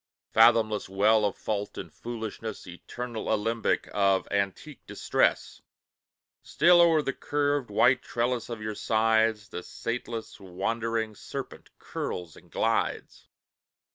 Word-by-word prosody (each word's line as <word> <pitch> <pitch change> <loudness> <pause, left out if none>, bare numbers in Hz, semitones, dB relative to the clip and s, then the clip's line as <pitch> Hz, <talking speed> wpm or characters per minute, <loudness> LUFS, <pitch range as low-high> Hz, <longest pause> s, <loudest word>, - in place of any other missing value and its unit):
Fathomless 110 -3 +4
well 105 +3 +3
of 100 - -1
fault 105 -1 -3
and - - -7
foolishness! 110 -2 -6
Eternal 115 +6 -6
alembic 110 +1 0
of 100 -2 +2
antique 100 - -3
distress! - - 0 0.8
Still 175 +3 +5
o'er 165 -3 +4
the 135 - -1
curved, 145 -3 -1
white 125 +5 +4
trellis 120 0 -2
of 115 -2 -6
your 110 0 -3
sides 110 -1 +1
The 90 - -6
sateless, 115 +2 -5
wandering 110 +4 -2
serpent - - -8
curls 85 -3 -5
and - - -17
glides. - - -1
110 Hz, 115 wpm, -27 LUFS, 105-120 Hz, 0.8 s, Still